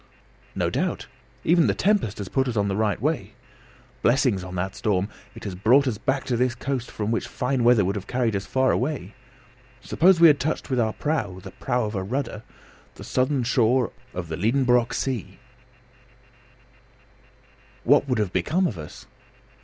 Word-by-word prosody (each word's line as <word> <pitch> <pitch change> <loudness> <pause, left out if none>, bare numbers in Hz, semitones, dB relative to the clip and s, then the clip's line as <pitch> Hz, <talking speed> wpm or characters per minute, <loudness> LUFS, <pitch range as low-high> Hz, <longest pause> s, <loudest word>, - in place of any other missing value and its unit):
"No - - 0
doubt; - - -2 0.4
even 170 0 +4
the - - +1
tempest 195 - +1
has 100 - -5
put 135 +6 0
us 120 -3 -2
on 100 -1 +1
the 95 - -1
right 105 0 0
way. 150 +6 -2 0.7
Blessings 120 -6 +2
on 90 0 -7
that 95 +3 -3
storm! 100 -2 0 0.3
It - - -11
has 100 - -4
brought 120 +9 +4
us 110 -5 -2
back 135 +2 -1
to 125 - -1
this 125 0 +1
coast 125 -1 -3
from 105 0 -3
which 115 - -1
fine 125 -1 -1
weather 120 -4 +5
would 100 +2 -1
have 100 -1 -6
carried 120 -4 0
us 100 - -3
far 130 0 +2
away. 125 - -2 0.7
Suppose 170 +6 +3
we 170 - +8
had 150 -4 +6
touched 155 -1 -2
with 130 - +1
our 110 -2 +1
prow 120 -12 -2
(the - - -10
prow 125 -3 -1
of 105 - -4
a 95 - -2
rudder!) 110 +2 -3 0.5
the - - -10
southern 130 0 0
shore 120 +1 +2 0.2
of 90 -4 -5
the 80 0 -4
Liedenbrock 120 +3 +2
sea, 115 -8 -3 2.5
what 140 +2 +4
would 125 - +1
have 105 -4 -1
become 160 - +1
of 100 - -3
us? 75 - -10
120 Hz, 180 wpm, -24 LUFS, 100-135 Hz, 2.5 s, we